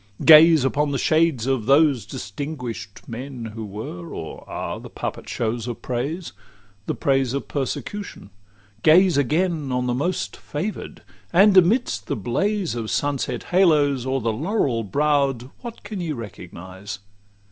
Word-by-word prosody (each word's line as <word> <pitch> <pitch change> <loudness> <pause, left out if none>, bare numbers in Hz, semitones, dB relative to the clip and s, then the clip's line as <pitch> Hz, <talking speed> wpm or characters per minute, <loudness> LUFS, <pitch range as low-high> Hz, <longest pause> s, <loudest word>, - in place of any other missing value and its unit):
Gaze 160 -2 +8
Upon 145 +2 +1
the 140 - -1
shades 155 -4 +2
of 130 -4 -1
those 140 -6 +4
distinguish'd 115 0 -6
men 120 -1 -6
Who 115 0 -6
were 100 -4 -7
or - - -7
are - - -4
the - - -10
puppet - - -6
shows 115 0 -2
of 120 - -6
praise, 140 +8 -3 0.5
The - - -1
praise 135 -2 +1
of 140 - -4
persecution; 145 - -5 0.5
gaze 175 - +6
again 155 +1 0
On 125 0 0
the 125 - 0
most 130 - -2
favour'd; 185 +9 -5 0.3
and 195 +3 +6
amidst 180 - +3
the - - -1
blaze 190 - -1
Of 115 -2 -4
sunset 135 -4 -1
halos 150 -8 +3
o'er 135 0 0
the 115 0 0
laurel 135 - 0
brow'd, 140 +2 0
What 235 -2 -8
can 205 -4 -5
ye 165 -3 -2
recognise? 95 -2 -8
135 Hz, 145 wpm, -23 LUFS, 115-160 Hz, 0.5 s, Gaze